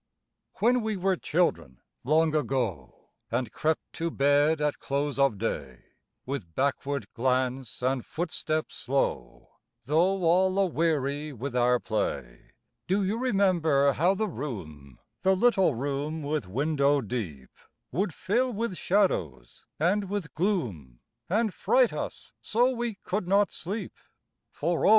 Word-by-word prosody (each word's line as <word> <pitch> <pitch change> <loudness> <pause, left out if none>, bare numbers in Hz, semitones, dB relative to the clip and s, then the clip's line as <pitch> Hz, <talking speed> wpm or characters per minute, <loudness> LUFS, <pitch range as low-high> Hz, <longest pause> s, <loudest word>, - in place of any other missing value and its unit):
When 245 +3 +3
we 220 -2 -2
were 190 +1 +1
children, 85 - 0 0.2
long 155 +3 +3
ago, 125 - -2 0.2
And 125 -4 -1
crept 155 0 -1
to 165 +1 -2
bed 145 +2 +3
at 150 -1 0
close 140 0 -2
of 135 -7 +3
day, 70 - -4 0.4
With 115 - -5
backward 140 -2 -1
glance 130 0 -1
and 130 -1 +1
footstep 155 -2 -2
slow, 70 - -2 0.3
Though 175 +7 +2
all 185 +3 +3
aweary 155 -5 0
with 130 +2 -5
our 125 0 +3
play, 65 - -3 0.3
Do 195 +2 +2
you 205 +4 -1
remember 175 - +3
how 175 +8 +2
the 215 +2 0
room 80 - -7 0.2
The 190 0 +4
little 190 - +3
room 145 +5 -3
with 145 -7 -2
window 140 +5 +2
deep 95 - -5 0.4
Would 195 0 0
fill 245 +10 0
with 225 -3 -2
shadows 85 - 0
and 190 +5 +1
with 200 -6 -3
gloom, 115 - -2 0.3
And 215 +2 +1
fright - - +3
us - - -6
so 245 +4 +2
we 240 -3 -3
could 185 -1 -2
not 200 +2 +3
sleep? 195 +3 -5 0.6
For 165 +2 -1
O! - - +5
150 Hz, 130 wpm, -28 LUFS, 125-190 Hz, 0.6 s, O